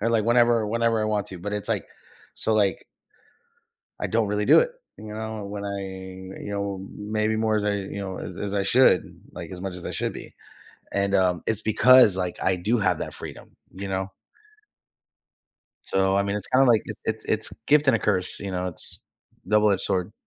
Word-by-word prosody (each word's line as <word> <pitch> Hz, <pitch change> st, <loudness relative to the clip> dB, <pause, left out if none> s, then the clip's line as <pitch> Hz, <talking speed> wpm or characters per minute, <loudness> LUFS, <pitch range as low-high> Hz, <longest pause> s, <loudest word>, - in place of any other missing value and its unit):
or, 115 Hz, +3 st, +1 dB
like, 110 Hz, -2 st, +2 dB
whenever 120 Hz, -1 st, +4 dB
whenever 115 Hz, +1 st, +1 dB
I -, -, 0 dB
want 105 Hz, -2 st, -1 dB
to, 95 Hz, -, -8 dB
but 100 Hz, +4 st, -5 dB
it's, 105 Hz, -1 st, -4 dB
like -, -, 0 dB, 0.5 s
so 110 Hz, -, 0 dB
like 100 Hz, -5 st, +1 dB, 1.2 s
I -, -, 0 dB
don't 110 Hz, -2 st, +1 dB
really 105 Hz, 0 st, -1 dB
do -, -, +8 dB
it, -, -, 0 dB, 0.3 s
you 105 Hz, -1 st, -9 dB
know, 110 Hz, -1 st, -5 dB
when 100 Hz, 0 st, -6 dB
I 100 Hz, 0 st, -3 dB, 0.6 s
you -, -, -6 dB
know, 100 Hz, -1 st, -3 dB
maybe 105 Hz, +1 st, -1 dB
more 110 Hz, 0 st, +1 dB
as 105 Hz, -, -1 dB
I, 105 Hz, -, +1 dB
you 100 Hz, 0 st, -5 dB
know, 95 Hz, -2 st, -5 dB
as -, -, -7 dB
as 100 Hz, 0 st, -3 dB
I 100 Hz, -, +1 dB
should, 130 Hz, +6 st, +3 dB
like, -, -, -8 dB
as 90 Hz, -1 st, -8 dB
much 95 Hz, -1 st, -4 dB
as 90 Hz, -, -9 dB
I -, -, -4 dB
should -, -, -2 dB
be, -, -, -10 dB, 0.6 s
and, 100 Hz, 0 st, +1 dB
um, 90 Hz, -2 st, +2 dB
it's 110 Hz, -1 st, 0 dB
because, 110 Hz, -1 st, +6 dB
like, 90 Hz, -2 st, -2 dB
I 95 Hz, -, +2 dB
do 110 Hz, +7 st, +1 dB
have 100 Hz, -4 st, +1 dB
that -, -, -5 dB
freedom, -, -, -10 dB, 0.2 s
you 95 Hz, +1 st, -6 dB
know? 95 Hz, 0 st, -3 dB, 1.7 s
So, 95 Hz, 0 st, +1 dB
I 100 Hz, -, +3 dB
mean, 100 Hz, +1 st, -2 dB
it's 105 Hz, -, -5 dB
kinda, 135 Hz, +1 st, +4 dB
like, 115 Hz, -3 st, +4 dB
it's -, -, -8 dB
it's 110 Hz, 0 st, -3 dB
it's 110 Hz, 0 st, -2 dB
gift 150 Hz, 0 st, +4 dB
and 130 Hz, -, +5 dB
a -, -, -3 dB
curse, 95 Hz, -4 st, -1 dB
you 100 Hz, -, -4 dB
know? 90 Hz, 0 st, -2 dB
It's 90 Hz, -, -6 dB, 0.5 s
double-edged 105 Hz, -1 st, +3 dB
sword. 95 Hz, +2 st, -1 dB
105 Hz, 205 wpm, -25 LUFS, 95-110 Hz, 1.7 s, do